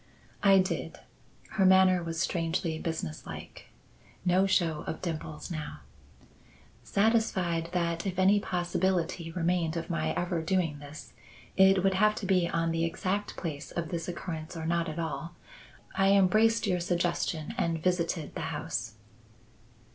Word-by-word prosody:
"I 195 -1 +6
did." 185 0 -1 0.5
Her 205 -3 +1
manner 190 -1 +6
was 165 -1 -4
strangely 165 -2 -1
businesslike. 160 - -6 0.6
No 185 +2 +4
show 165 -5 +1
of - - -3
dimples 155 -2 -5
now. 155 -2 -5 1.0
"Satisfied 195 -6 +1
that 170 0 -1
if 185 -1 -3
any 195 +2 +5
possibility 175 -2 -1
remained 170 -1 0
of 165 - -4
my 80 0 0
ever 175 -2 -1
doing 165 -3 0
this, 145 0 -11 0.4
it 190 -1 +5
would 195 0 +3
have 210 +3 +3
to 205 - -5
be 180 -3 +2
on 165 -1 0
the 165 0 0
exact 190 +4 -2
place 155 -5 -5
of 170 -2 -4
this 170 -2 -3
occurrence 170 -2 -5
or 160 - -4
not 170 0 0
at 155 - -6
all, 165 +1 -4 0.6
I 195 +1 +4
embraced 215 +4 +4
your 180 -3 +1
suggestion 170 -3 -1
and 170 -3 0
visited 170 -3 0
the - - -5
house." 115 -1 -4
175 Hz, 140 wpm, -29 LUFS, 165-190 Hz, 1.0 s, I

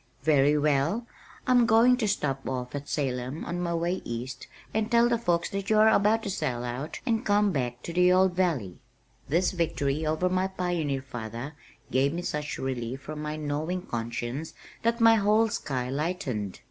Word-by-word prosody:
"Very 145 -1 +4
well. 150 - +1 0.4
I'm 245 -2 +4
going 235 +3 +6
to 225 -4 0
stop 140 -10 -1
off 125 -1 -4
at 145 0 -5
Salem 130 0 -2
on 175 - -3
my 170 -1 -1
way 175 +3 -1
East 125 +3 -6 0.3
and 220 0 0
tell 235 0 +5
the 235 -1 +1
folks 175 -6 0
that 195 0 -3
you 215 - +4
are 215 +1 +7
about 220 +2 +3
to - - -3
sell 130 -9 -2
out 125 +5 -5
and 230 -2 +1
come 205 0 +3
back 125 -5 -3
to 170 - -5
the 180 +1 +5
old 185 0 +4
valley." 160 - -1 0.5
This 175 +5 +2
victory 155 -4 -1
over 155 +3 +1
my 185 +1 +1
pioneer 175 -8 -2
father 120 +2 -6 0.4
gave 135 +3 +2
me 175 +1 -3
such 150 -2 -3
relief 130 -1 -3
from 150 +2 -6
my 150 0 -3
gnawing 155 +4 -2
conscience 120 +4 -4 0.3
that 230 +1 0
my 225 0 +7
whole 215 +2 +3
sky 130 -9 -3
lightened. 135 - -3
155 Hz, 180 wpm, -27 LUFS, 135-190 Hz, 0.5 s, are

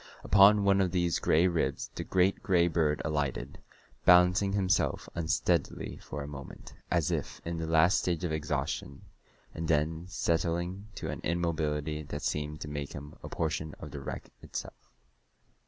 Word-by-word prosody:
Upon 100 +1 +6
one 100 0 +4
of 95 - +2
these 85 -1 +1
gray 80 +2 +3
ribs 80 -6 -1
the - - -4
great 95 +1 +2
gray 85 -2 +3
bird 80 -3 +1
alighted, 75 -3 -2 0.4
balancing 90 +2 +5
himself 95 -2 +1
unsteadily 85 0 0
for 70 +2 -6
a - - -6
moment, 70 -2 -9 0.2
as - - +1
if - - -3
in 85 0 -3
the 80 - -3
last 80 +3 +4
stage 90 -1 -1
of 85 - -1
exhaustion, 75 -2 -3 0.5
and 80 0 -4
then 80 +2 0
settling 85 +3 -1
to - - -4
an - - -6
immobility 75 -3 -1
that 75 - -6
seemed 75 0 -2
to - - -5
make 75 -1 -5
him 75 +1 -8
a - - -8
portion 80 -1 -2
of - - -8
the 70 - -6
wreck 70 - -7
itself. - - -8
80 Hz, 160 wpm, -30 LUFS, 75-90 Hz, 0.5 s, Upon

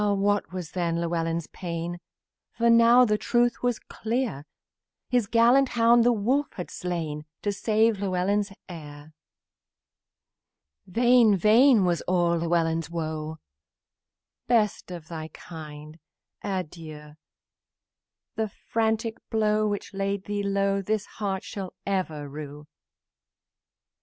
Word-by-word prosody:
What 205 0 0
was 180 -4 -6
then 170 -2 -1
Llewellyn's 165 -1 -1
pain! 170 0 -5 0.5
For 235 0 +3
now 235 +2 +7
the 210 -2 +1
truth 240 0 +1
was 245 -2 +1
clear: 225 - -3 0.6
The 250 -1 +4
gallant 245 +3 +5
hound 230 +1 +5
the 245 - +5
wolf 250 +7 +1
had 180 - -7
slain 160 -4 -4 0.2
To 205 - +1
save 220 +1 +2
Llewellyn's 200 +1 0 0.2
heir. 150 -3 -10 1.7
Vain, 235 +1 +5
vain 220 +3 +5
was 175 -2 +1
all 175 -2 +2
Llewellyn's 165 -1 0
woe; 160 -1 -4 1.1
"Best 220 -6 +1
of 170 -3 -8
thy 160 -1 -6
kind, 155 -1 -10 0.4
adieu! 155 -5 -6 1.2
The 220 -1 -2
frantic 225 +2 -1
deed 215 -1 +2
which 205 -1 -3
laid 195 0 -2
thee 205 0 -3
low 195 0 +1
This 215 +1 -1
heart 195 -3 -4
shall 195 -3 -7
ever 170 -7 -2
rue!" 145 +1 -8
195 Hz, 110 wpm, -26 LUFS, 165-220 Hz, 1.7 s, now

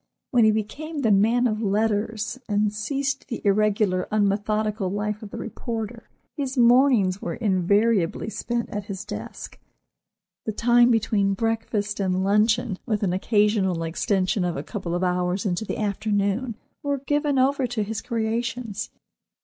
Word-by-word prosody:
When 240 -3 +5
he 215 - +6
became 285 +9 -3
the 225 -5 +3
man 225 +5 +4
of 215 -2 0
letters, 220 +2 0
and 205 0 +1
ceased 270 +5 -2
the 235 - -4
irregular, 200 -2 +2
unmethodical 210 0 0
life 210 +2 -2
of 215 - -8
the - - -7
reporter, 230 0 -5 0.3
his 275 -3 -3
mornings 240 -6 +4
were 170 - -3
invariably 200 -2 +1
spent 235 +2 -3
at 205 -1 -4
his 200 0 -6
desk. 210 0 -7 0.9
The 220 - -1
time 240 +2 +4
between 210 -4 +2
breakfast 220 -1 -1
and 185 -1 0
luncheon, 210 +1 +2
with 215 -3 0
an 180 -3 +1
occasional 200 -3 +2
extension 185 +3 0
of 175 -1 -1
a - - -4
couple 185 -6 -4
of 175 - -1
hours 180 +1 0
into 190 +2 -1
the - - -4
afternoon, 210 +2 -1 0.3
were 285 -2 -1
given 290 -1 +1
over 265 0 +2
to 230 -3 -2
his 220 +1 -4
creations. 230 -2 -2
215 Hz, 150 wpm, -24 LUFS, 200-235 Hz, 0.9 s, he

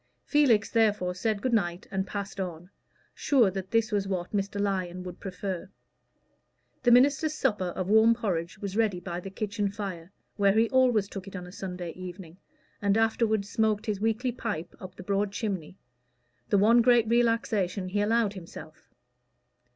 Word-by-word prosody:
Felix 250 -9 +3
therefore 210 -5 +2
said 205 +2 -2
good 255 - 0
night 175 -5 0
and 190 0 -2
passed 200 -1 -5
on, 175 -1 -5 0.4
sure 245 -9 +3
that 190 0 -5
this 230 +1 +1
was 200 -2 0
what 185 -2 -3
Mr. 200 +1 -2
Lyon 185 -3 -2
would 180 0 -8
prefer. 190 -1 -5 1.1
The 245 - +3
minister's 280 +5 +4
supper 210 -11 0
of 185 - -3
warm 220 +3 +5
porridge 185 -5 -3
was 195 0 -5
ready 215 -5 +1
by 175 -1 -5
the 195 - -7
kitchen 205 +1 -2
fire, 195 -4 -6 0.3
where 200 -1 +4
he 225 +2 +3
always 245 -6 +3
took 195 -1 -8
it 195 - -9
on 180 -1 -6
a 180 - -11
Sunday 180 -3 -6
evening, 180 -1 -9 0.4
and 200 0 +2
afterward 220 -2 +1
smoked 215 +1 0
his 205 -2 -2
weekly 225 +3 0
pipe 210 -8 -5
up 185 -1 -10
the 185 - -10
broad 200 +1 0
chimney 195 -5 -4 0.7
the 205 - +3
one 225 +4 +5
great 235 -1 +4
relaxation 220 -5 +1
he 205 +2 0
allowed 220 0 +2
himself. 180 -4 -11
200 Hz, 165 wpm, -28 LUFS, 185-225 Hz, 1.1 s, warm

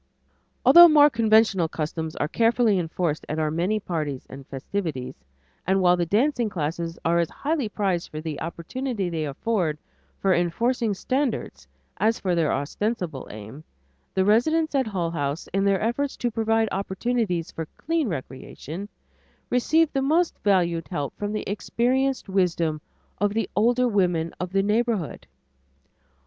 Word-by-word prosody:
Although 345 0 +10
more 295 -2 +6
conventional 220 -6 +3
customs 160 0 -4
are 145 - -1
carefully 230 +1 +2
enforced 165 -2 -2
at 155 - -2
our 155 -1 0
many 180 +7 0
parties 155 -8 -4
and 135 0 -11
festivities, 140 -2 -4 0.5
and 190 +1 +3
while 180 -1 +5
the 175 -1 -1
dancing 240 - +1
classes 165 -1 -3
are 170 +1 +3
as 170 - +1
highly 290 -6 -2
prized 190 -5 -1
for 155 - -6
the 155 -2 -5
opportunity 190 +5 -3
they 160 -2 -2
afford 160 +2 -1 0.4
for 195 -1 +2
enforcing 220 +6 0
standards 230 - -2 0.3
as 220 +5 +1
for 185 -2 0
their 165 -3 +2
ostensible 170 - -3
aim, 110 +8 -10 0.5
the 190 - +2
residents 315 +10 +2
at 265 -4 +1
Hull 180 -5 -2
House, 145 -1 -3
in 195 +1 +1
their 195 -1 +3
efforts 255 +5 -1
to 240 - -1
provide 225 0 +1
opportunities 195 -2 -1
for 160 -1 -5
clean 325 -3 0
recreation, 160 +4 -6 0.6
receive 310 +6 +3
the 270 - +1
most 320 +5 +2
valued 175 -5 +1
help 145 -6 -4
from 205 0 -3
the 215 - -3
experienced 255 +6 0
wisdom 170 -5 0 0.4
of 205 0 +1
the 225 - 0
older 245 +4 +3
women 180 -6 +1
of 180 0 -4
the 195 0 +2
neighborhood. 215 -5 -1
195 Hz, 150 wpm, -25 LUFS, 165-230 Hz, 0.6 s, Although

